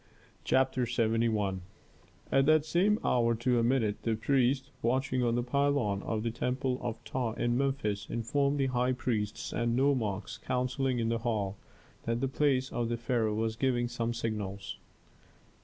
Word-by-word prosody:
CHAPTER 130 -1 +2
LXVI 110 -4 +1 0.7
At 135 +1 +4
that 155 -1 +5
same 190 +6 +3
hour 115 -1 +3
to 120 +1 +1
a - - +2
minute, 115 -4 +1
the 115 -1 0
priest, 130 +3 +1
watching 130 +2 +1
on 120 -1 +2
the 120 - 0
pylon 125 -6 +1
of 110 -1 -2
the 115 - -1
temple 125 +2 -1
of 120 -2 -4
Ptah 125 -4 -2
in 120 +1 0
Memphis, 130 -7 -1
informed 140 +5 0
the 135 - +3
high 125 0 +1
priests 110 -5 -2
and 120 0 0
nomarchs 115 -8 0
counselling 125 +1 -1
in 115 -1 0
the 115 0 0
hall, 105 -4 -1 0.5
that 115 0 0
the 135 - 0
palace 135 -1 +1
of 120 -1 -1
the 120 - -1
pharaoh 115 -2 0
was 110 0 -1
giving 120 -1 +1
some 120 -1 -2
signals. 105 -4 -4
120 Hz, 160 wpm, -30 LUFS, 115-130 Hz, 0.7 s, that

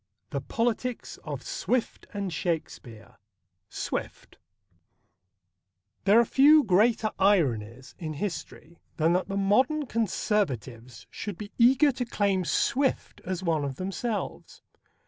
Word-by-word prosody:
XIV. - - -52
THE - - -2
POLITICS 240 +1 -2
OF - - -7
SWIFT 250 -2 -2
AND 200 -4 -4
SHAKESPEARE 120 - -4
(1) - - -24 0.6
SWIFT - - -5 1.7
There 205 +3 +6
are 235 - +4
few 295 +5 +6
greater 215 +2 +3
ironies 130 - +1
in 155 -2 -4
history 170 -1 -6 0.2
than 165 +2 +3
that 180 +1 0
the 195 0 -3
modern 255 +10 +2
Conservatives 130 - -2
should 205 -5 -6
be 210 -1 -8
eager 265 +5 +5
to 255 -1 -3
claim 200 -5 0
Swift 270 +9 0
as 185 0 -3
one 160 -4 0
of 140 -2 -3
themselves. 200 - -4
200 Hz, 125 wpm, -27 LUFS, 160-235 Hz, 1.7 s, There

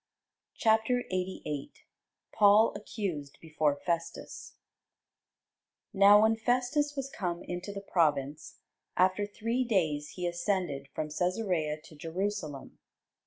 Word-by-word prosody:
CHAPTER 225 +3 +2
88 180 -6 -4 0.5
PAUL 210 +2 +6
ACCUSED 185 -9 -5
BEFORE 155 -2 0
FESTUS 170 -1 -4 1.4
Now 205 +1 +7
when 220 +1 +4
Festus 255 +6 0
was 275 -1 -4
come 175 -2 -3
into 180 +3 -5
the 200 0 -6
province, 150 -6 0 0.4
after 185 +3 +3
three 230 +5 -1
days 160 -10 0
he 180 - -3
ascended 175 -5 -1
from 155 - -2
Cæsarea 170 -3 -1
to 165 -1 -14
Jerusalem. 165 -2 -4
185 Hz, 105 wpm, -30 LUFS, 155-210 Hz, 1.4 s, Now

